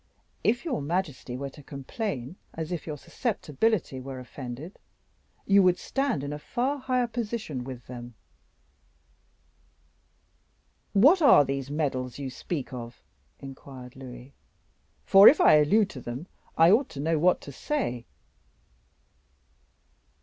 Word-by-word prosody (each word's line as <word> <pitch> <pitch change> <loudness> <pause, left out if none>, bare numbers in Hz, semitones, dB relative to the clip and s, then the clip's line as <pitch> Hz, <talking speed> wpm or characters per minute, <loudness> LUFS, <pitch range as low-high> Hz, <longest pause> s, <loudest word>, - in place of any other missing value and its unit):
If 240 +8 +1
your 285 - -1
majesty 145 -6 -3
were 140 +1 -5
to 145 - -14
complain 140 - -5 0.2
as 160 +1 -5
if 170 -4 -4
your 150 -2 -4
susceptibility 200 - -1
were 130 0 -7
offended, 130 +6 -8 0.7
you 200 0 +5
would 180 -1 +4
stand 270 - -1
in 145 +1 -4
a 150 - -6
far 260 - -2
higher 255 -1 +1
position 220 - -4
with 125 -2 -8
them." 120 -1 -9 2.8
"What 285 - +6
are 275 - +7
these 135 0 -3
medals 135 -4 -2
you 135 -2 -5
speak 140 -1 -5
of?" 120 -1 -8 0.4
inquired 130 -2 -10
Louis; 130 0 -11 0.7
"for 195 +1 +9
if 295 - +8
I - - +7
allude 200 +8 +3
to 130 - -9
them, 120 +7 -6 0.3
I 165 +2 +7
ought 245 +6 +3
to 140 - -9
know 160 +2 +1
what 180 +3 +4
to 140 - -9
say." 125 - -3
150 Hz, 130 wpm, -27 LUFS, 130-205 Hz, 2.8 s, for